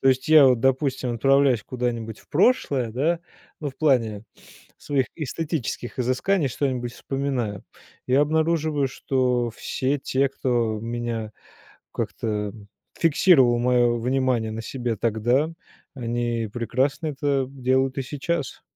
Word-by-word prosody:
То 135 Hz, -, +3 dB
есть 130 Hz, +1 st, +1 dB
я 155 Hz, -3 st, +8 dB
вот, 125 Hz, -3 st, +3 dB
допустим, 135 Hz, -1 st, +1 dB
отправляясь 135 Hz, -1 st, +3 dB
куда-нибудь 115 Hz, -3 st, -3 dB
в -, -, -22 dB
прошлое, 145 Hz, -, +2 dB
да- 155 Hz, +9 st, 0 dB, 0.4 s
ну 145 Hz, -2 st, -3 dB
в 130 Hz, -, -21 dB
плане 115 Hz, -8 st, +1 dB, 0.5 s
своих 135 Hz, -3 st, -1 dB
эстетических 150 Hz, -5 st, -4 dB
изысканий 135 Hz, +7 st, +1 dB
что-нибудь 125 Hz, -2 st, -2 dB
вспоминаю- 130 Hz, -9 st, -3 dB, 0.4 s
и 125 Hz, -, +1 dB
обнаруживаю, 155 Hz, 0 st, +2 dB
что 125 Hz, -2 st, 0 dB
все 130 Hz, +4 st, -2 dB
те, 135 Hz, 0 st, +1 dB
кто 120 Hz, -5 st, -1 dB
меня 115 Hz, -1 st, -4 dB, 0.6 s
как-то 105 Hz, -2 st, -3 dB, 0.4 s
фиксировал 145 Hz, -7 st, +4 dB
мое 120 Hz, -1 st, +3 dB
внимание 125 Hz, -2 st, 0 dB
на 110 Hz, +1 st, -5 dB
себе 120 Hz, 0 st, -3 dB
тогда, 120 Hz, +7 st, +1 dB, 0.4 s
они 120 Hz, -2 st, -2 dB
прекрасно 130 Hz, +7 st, -1 dB
это 140 Hz, -2 st, 0 dB
делают 130 Hz, 0 st, 0 dB
и -, -, 0 dB
сейчас. 140 Hz, +2 st, -3 dB
130 Hz, 120 wpm, -24 LUFS, 120-140 Hz, 0.6 s, я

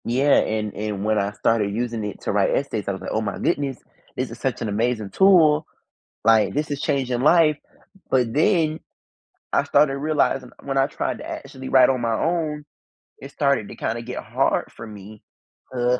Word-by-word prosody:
Yeah, 135 Hz, +4 st, +2 dB
and 105 Hz, -1 st, -2 dB
and 105 Hz, -1 st, -4 dB
when 110 Hz, 0 st, +2 dB
I 100 Hz, 0 st, -1 dB
started 105 Hz, -1 st, 0 dB
using 115 Hz, 0 st, -2 dB
it 105 Hz, -, -6 dB
to -, -, -2 dB
write 100 Hz, -1 st, +2 dB
essays, 125 Hz, -6 st, -2 dB
I -, -, +1 dB
was 95 Hz, -, -6 dB
like, -, -, -5 dB
"Oh 110 Hz, -, 0 dB
my 100 Hz, -2 st, -3 dB
goodness, 140 Hz, -5 st, -1 dB, 0.4 s
this -, -, -3 dB
is -, -, -9 dB
such -, -, -2 dB
an 110 Hz, -, -2 dB
amazing 110 Hz, 0 st, -1 dB
tool, 160 Hz, -6 st, +5 dB, 0.6 s
like, 110 Hz, -1 st, +4 dB
this 150 Hz, 0 st, -1 dB
is 145 Hz, 0 st, -3 dB
changing 130 Hz, -3 st, -1 dB
life, 155 Hz, 0 st, +4 dB, 0.5 s
but 125 Hz, -3 st, +1 dB
then, 160 Hz, -1 st, +2 dB, 0.7 s
I -, -, +2 dB
started 140 Hz, -2 st, +3 dB
realizing 140 Hz, -4 st, 0 dB
when 135 Hz, -1 st, -2 dB
I 135 Hz, -, +4 dB
tried 145 Hz, -, -3 dB
to 305 Hz, -, -9 dB
actually 225 Hz, -, -7 dB
write 130 Hz, -2 st, +6 dB
on 130 Hz, -2 st, +1 dB
my 115 Hz, -1 st, 0 dB
own, 155 Hz, +2 st, -1 dB, 0.6 s
it 135 Hz, -, -9 dB
started 140 Hz, -8 st, 0 dB
to -, -, -9 dB
kinda 115 Hz, +1 st, -3 dB
get 125 Hz, +2 st, -6 dB
hard -, -, 0 dB
for -, -, -9 dB
me, 105 Hz, 0 st, -12 dB, 0.5 s
uh 125 Hz, 0 st, +1 dB
125 Hz, 190 wpm, -23 LUFS, 110-150 Hz, 0.7 s, write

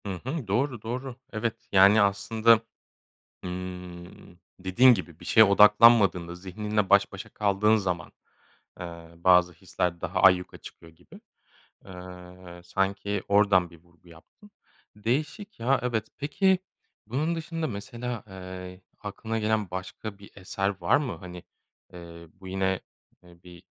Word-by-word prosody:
Hı -, -, -4 dB, 0.2 s
hı. 135 Hz, -3 st, -4 dB
Doğru, 120 Hz, +3 st, -1 dB
doğru. 125 Hz, +3 st, -5 dB, 0.2 s
Evet, 110 Hz, 0 st, -4 dB
yani, 100 Hz, +2 st, +6 dB
aslında, 110 Hz, +3 st, +3 dB, 0.9 s
ımm, 90 Hz, -1 st, -8 dB, 0.2 s
dediğin 120 Hz, +8 st, +5 dB
gibi 90 Hz, -5 st, -7 dB
bir -, -, -12 dB
şeye 110 Hz, -, +6 dB
odaklanmadığında, 105 Hz, -4 st, +5 dB
zihninle 105 Hz, +3 st, -3 dB
baş 100 Hz, 0 st, +4 dB
başa 95 Hz, -, -8 dB
kaldığın 105 Hz, +1 st, +2 dB
zaman, 90 Hz, -5 st, -3 dB, 0.7 s
eee, 85 Hz, -1 st, -9 dB
bazı 90 Hz, 0 st, +4 dB
hisler 85 Hz, 0 st, -3 dB
daha -, -, -2 dB
ayyuka 90 Hz, -1 st, +4 dB
çıkıyor 80 Hz, -, -14 dB
gibi. 85 Hz, +2 st, -17 dB, 0.6 s
Eee, 90 Hz, -1 st, -12 dB
sanki 95 Hz, +2 st, -2 dB
oradan 100 Hz, -4 st, +3 dB
bir 85 Hz, -, -15 dB
vurgu 85 Hz, 0 st, -25 dB
yaptın. 85 Hz, -, -19 dB, 0.5 s
Değişik, 150 Hz, -, -3 dB
ya, 130 Hz, +4 st, +2 dB
evet. 115 Hz, -3 st, -1 dB
Peki 190 Hz, +6 st, +2 dB, 0.5 s
bunun 145 Hz, +9 st, -1 dB
dışında 165 Hz, 0 st, -4 dB
mesela, 120 Hz, +1 st, -6 dB
eee, 90 Hz, -1 st, -9 dB, 0.2 s
aklına 110 Hz, +2 st, -5 dB
gelen 110 Hz, -3 st, -1 dB
başka 95 Hz, +3 st, -7 dB
bir 100 Hz, -, -15 dB
eser 95 Hz, 0 st, -2 dB
var -, -, +3 dB
mı? 145 Hz, -5 st, -2 dB
Hani, 90 Hz, -2 st, -10 dB, 0.5 s
eee, 85 Hz, -1 st, -11 dB
bu 95 Hz, 0 st, -13 dB
yine, 95 Hz, 0 st, -1 dB, 0.4 s
eee, 85 Hz, -1 st, -19 dB
bir 90 Hz, -1 st, -14 dB
100 Hz, 130 wpm, -26 LUFS, 90-110 Hz, 0.9 s, yani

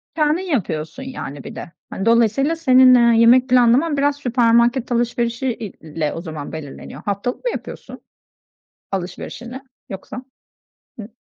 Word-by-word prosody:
Kendin 305 Hz, +3 st, +1 dB
yapıyorsun 200 Hz, -, -3 dB
yani 145 Hz, -, -7 dB
bir -, -, -9 dB
de. -, -, -8 dB, 0.2 s
Hani 195 Hz, -, -5 dB
dolayısıyla 235 Hz, +7 st, +2 dB
senin, 260 Hz, -5 st, +6 dB
eee, 235 Hz, -1 st, +4 dB
yemek 250 Hz, +2 st, +5 dB
planlaman 255 Hz, +5 st, +3 dB
biraz 285 Hz, 0 st, +1 dB
süpermarket 240 Hz, -1 st, +2 dB
alışverişi 240 Hz, +1 st, -1 dB
i 230 Hz, -3 st, -3 dB
ile 155 Hz, -1 st, -5 dB
o 165 Hz, -, -6 dB
zaman 155 Hz, -4 st, -7 dB
belirleniyor. 150 Hz, -1 st, -9 dB
Haftalık 205 Hz, -, -3 dB
mı 485 Hz, -, +1 dB
yapıyorsun -, -, -9 dB, 0.9 s
alışverişini 210 Hz, +7 st, -6 dB, 0.3 s
yoksa? 210 Hz, +6 st, -8 dB, 0.7 s
Hıh. 210 Hz, -, -7 dB
235 Hz, 135 wpm, -20 LUFS, 195-260 Hz, 0.9 s, senin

